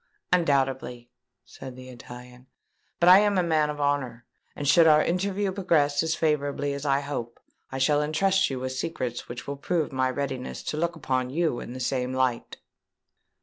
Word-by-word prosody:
"Undoubtedly," 135 -7 0 0.3
said 130 -1 -10
the 130 0 -11
Italian. 125 +1 -12 0.5
"But 170 - +3
I 185 +2 +9
am 205 -1 +2
a 180 - +3
man 155 -3 +1
of 150 0 -5
honour; 135 -5 -1 0.3
and 145 - -4
should 160 +4 +6
our 155 -1 +6
interview 195 +3 -1
progress 165 -7 +1
as 160 0 0
favourably 145 -2 -1
as 140 +1 -5
I 140 0 +2
hope, 130 -5 -5 0.3
I 135 - -4
shall 145 +2 +2
entrust 190 +6 +1
you 135 -2 -4
with 130 0 -3
secrets 130 -3 -4
which 120 0 -7
will 140 0 -5
prove 160 +2 -1
my 130 -1 0
readiness 130 -1 -4
to 150 - -4
look 170 +2 -1
upon 130 -4 -2
you 155 -3 0
in 120 - -8
the 130 - -7
same 125 0 -2
light." 130 -2 -1
140 Hz, 180 wpm, -26 LUFS, 130-160 Hz, 0.5 s, I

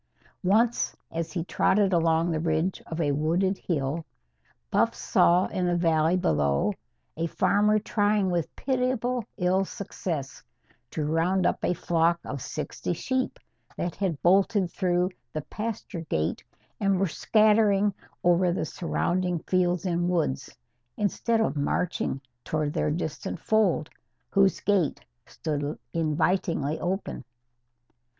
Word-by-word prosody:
Once, 220 +6 +2
as 165 -1 -3
he 170 -2 -2
trotted 195 +2 +2
along 165 0 +2
the 160 - 0
ridge 160 +3 0
of 160 - -5
a 150 -3 +2
wooded 170 +7 +1
hill, 155 -1 -2 0.7
Buff - - +2
saw 180 +2 +3
in 180 -1 -1
the 175 - +2
valley 165 0 +3
below 75 - +1 0.4
a 165 +1 -1
farmer 205 +5 +3
trying 205 -2 +1
with 170 -3 -2
pitiable 250 -2 0
ill 185 +1 +2
success 170 -7 -5 0.5
to 155 +3 -3
round 170 +5 +1
up - - 0
a 180 - +1
flock 170 0 +2
of 140 - -5
sixty 150 +4 -4
sheep 260 +9 -2 0.4
that 175 - -2
had 185 -7 -1
bolted 190 0 +3
through 180 -1 +1 0.2
the 155 - -2
pasture 210 -4 -5
gate 80 +1 -1 0.4
and 195 -2 +2
were 195 - +3
scattering 210 +3 +3 0.3
over 175 0 +4
the 170 -2 -1
surrounding 180 +2 -1
fields 180 -1 +1
and 175 -1 0
woods; 155 -7 0 0.5
instead 225 +2 +1
of 220 - +1
marching 145 0 -1 0.2
toward 155 -1 -1
their - - 0
distant 155 0 -3
fold, 195 -8 +2 0.4
whose 195 -1 +3
gate 195 -7 +1 0.3
stood 145 -1 -3 0.2
invitingly 165 -1 0
open. 190 +2 -3
175 Hz, 130 wpm, -27 LUFS, 160-195 Hz, 0.7 s, over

